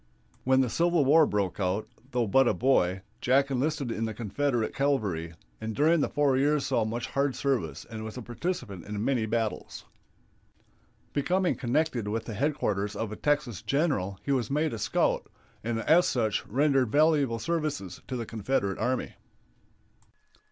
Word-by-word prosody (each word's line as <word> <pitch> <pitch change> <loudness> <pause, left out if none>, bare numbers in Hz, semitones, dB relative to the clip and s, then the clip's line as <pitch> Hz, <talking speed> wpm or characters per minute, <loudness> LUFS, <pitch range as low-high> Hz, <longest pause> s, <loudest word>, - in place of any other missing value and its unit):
When 130 +1 +4
the 130 - +1
Civil 170 -3 +2
War 155 +3 +6
broke 100 -3 -1
out, 95 +2 -1 0.2
though 125 -3 0
but 130 +5 +4
a 105 - +2
boy, 95 -6 +2 0.2
Jack 135 +2 +3
enlisted 135 -1 -1
in 115 0 -2
the 110 -1 -4
Confederate 120 +1 -1
cavalry, 100 - 0 0.3
and 110 -1 -4
during 160 +3 +4
the - - +1
four 145 -2 +2
years 145 +2 +2
saw 115 - +1
much 115 +2 -3
hard 140 -1 0
service 120 - -1
and 110 -2 -7
was 110 +2 -7
a 125 - -6
participant 120 - -4
in 105 +1 -3
many 125 -5 +1
battles. 115 -1 -3 1.3
Becoming 180 +6 +1
connected 130 -3 -1
with 110 +2 -2
the 115 - -5
headquarters 105 -6 -1
of 110 -2 -3
a - - -4
Texas 145 - 0
general 135 - 0
he 140 - -2
was 125 -5 0
made 150 +1 0
a 115 - -4
scout, 100 -1 +1 0.4
and 115 0 -1
as 170 +7 +4
such 110 -4 0
rendered 135 -1 +2
valuable 145 -5 +3
services 150 - -3
to 130 - -4
the 120 -2 -3
Confederate 105 -3 -1
army. 130 +1 -1
125 Hz, 165 wpm, -28 LUFS, 110-145 Hz, 1.3 s, War